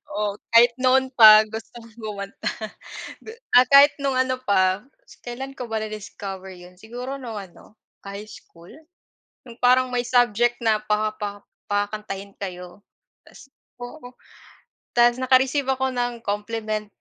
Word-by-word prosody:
Oo, 205 Hz, -1 st, -2 dB, 0.2 s
kahit 235 Hz, +1 st, +6 dB
noon 260 Hz, +1 st, +2 dB
pa 215 Hz, -3 st, +9 dB
gusto 220 Hz, +1 st, -8 dB
kong 230 Hz, -1 st, -17 dB
kumanta. 205 Hz, -3 st, -5 dB, 0.7 s
Gu -, -, -9 dB, 0.3 s
ah, 250 Hz, -, +7 dB
kahit 280 Hz, +1 st, +8 dB
nung 270 Hz, -2 st, 0 dB
ano 260 Hz, 0 st, 0 dB
pa, 190 Hz, -2 st, +1 dB, 0.4 s
kailan 265 Hz, +3 st, -7 dB
ko 245 Hz, -2 st, -7 dB
ba 220 Hz, -1 st, -1 dB
discover 195 Hz, -2 st, -8 dB
yun? 180 Hz, 0 st, -14 dB
Siguro 245 Hz, +7 st, -7 dB
nung 235 Hz, -6 st, -7 dB
ano, 195 Hz, +2 st, -14 dB, 0.3 s
high 200 Hz, +1 st, -8 dB
school? 170 Hz, -3 st, -15 dB, 0.7 s
Yung 235 Hz, -1 st, -12 dB
parang 255 Hz, +1 st, +4 dB
may 245 Hz, -1 st, -1 dB
subject 240 Hz, -1 st, +2 dB
na 220 Hz, -2 st, +2 dB
pa 215 Hz, 0 st, -1 dB
pa 205 Hz, -1 st, -6 dB, 0.3 s
pakakantahin 205 Hz, -1 st, -3 dB
kayo 180 Hz, 0 st, -8 dB, 0.4 s
ta's -, -, -16 dB, 0.3 s
oo. 245 Hz, +1 st, -9 dB, 0.8 s
Ta's 240 Hz, 0 st, +4 dB
naka-receive 260 Hz, +2 st, +2 dB
ako 265 Hz, 0 st, -1 dB
ng 245 Hz, -1 st, -2 dB
compliment 215 Hz, +1 st, -3 dB
225 Hz, 140 wpm, -23 LUFS, 205-250 Hz, 0.8 s, pa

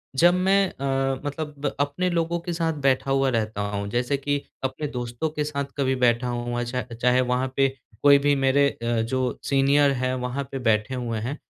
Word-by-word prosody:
जब 175 Hz, +5 st, +5 dB
मैं 190 Hz, +1 st, +3 dB
अ, 135 Hz, -1 st, -1 dB
मतलब 145 Hz, -1 st, -4 dB
अपने 145 Hz, +6 st, 0 dB
लोगों 170 Hz, 0 st, 0 dB
के 175 Hz, 0 st, -4 dB
साथ 165 Hz, -1 st, 0 dB
बैठा 135 Hz, 0 st, +2 dB
हुआ 135 Hz, 0 st, +3 dB
रहता 110 Hz, -3 st, -1 dB
हूँ 100 Hz, 0 st, -3 dB
जैसे 125 Hz, +5 st, 0 dB
कि 145 Hz, +1 st, -1 dB, 0.2 s
अपने 145 Hz, +3 st, -2 dB
दोस्तों 125 Hz, +2 st, -3 dB
के 150 Hz, -1 st, -2 dB
साथ 140 Hz, -2 st, -3 dB
कभी 130 Hz, -1 st, +1 dB
बैठा 125 Hz, 0 st, +2 dB
हूँ, 120 Hz, 0 st, -2 dB
अ, -, -, 0 dB
चा 125 Hz, +1 st, -2 dB, 0.2 s
चाहे 125 Hz, +1 st, +4 dB
वहाँ 125 Hz, +1 st, 0 dB
पे 135 Hz, 0 st, +4 dB, 0.4 s
कोई 140 Hz, -1 st, +8 dB
भी 145 Hz, -1 st, +4 dB
मेरे 135 Hz, +1 st, +3 dB
अ, 115 Hz, -2 st, -2 dB
जो 130 Hz, +2 st, -1 dB
सीनियर 140 Hz, +1 st, +3 dB
है 130 Hz, 0 st, 0 dB
वहाँ 125 Hz, +3 st, -3 dB
पे 135 Hz, -, -4 dB
बैठे 110 Hz, +1 st, +1 dB
हुए 115 Hz, -3 st, -3 dB
हैं। 125 Hz, +7 st, -4 dB
135 Hz, 200 wpm, -24 LUFS, 125-145 Hz, 0.4 s, कोई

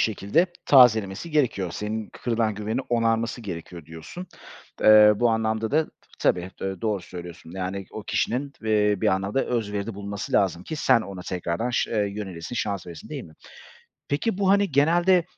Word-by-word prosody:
şekilde 110 Hz, -, +2 dB, 0.2 s
tazelemesi 110 Hz, -, +5 dB
gerekiyor. 125 Hz, -, +1 dB
Senin 110 Hz, 0 st, -4 dB
kırılan 115 Hz, -3 st, -1 dB
güvenini 110 Hz, +4 st, -2 dB
onarması 115 Hz, 0 st, 0 dB
gerekiyor, 85 Hz, -5 st, -8 dB
diyorsun. 80 Hz, -, -9 dB, 0.6 s
Eee, 105 Hz, 0 st, +8 dB
bu 120 Hz, +2 st, +3 dB
anlamda 110 Hz, 0 st, 0 dB
da, 155 Hz, +2 st, +2 dB, 0.3 s
tabii, 90 Hz, +1 st, +1 dB
eee, 95 Hz, -2 st, -4 dB
doğru 105 Hz, -3 st, -1 dB
söylüyorsun, 85 Hz, -2 st, -10 dB
yani, 95 Hz, +1 st, -4 dB
o 110 Hz, -, -7 dB
kişinin, 140 Hz, +4 st, -1 dB
eee, 105 Hz, -1 st, +3 dB
bir -, -, +2 dB
anlamda 100 Hz, +7 st, 0 dB
özveride 105 Hz, -2 st, -2 dB
bulunması 100 Hz, 0 st, -6 dB
lazım 95 Hz, -3 st, +2 dB
ki 155 Hz, -, -5 dB
sen 130 Hz, -5 st, +4 dB
ona 100 Hz, -4 st, -7 dB
tekrardan 90 Hz, +6 st, -2 dB
şı 120 Hz, -, 0 dB
eee, 105 Hz, -3 st, +1 dB
yönelesin, 95 Hz, -1 st, -6 dB
şans 100 Hz, -4 st, -2 dB
veresin 85 Hz, -3 st, -10 dB
değil -, -, -6 dB
mi? 80 Hz, -, -15 dB, 0.7 s
Peki, 185 Hz, +8 st, -1 dB
bu, 195 Hz, -1 st, +2 dB
hani, 200 Hz, -1 st, +3 dB
genelde, 170 Hz, +5 st, +4 dB
110 Hz, 160 wpm, -25 LUFS, 95-125 Hz, 0.7 s, Eee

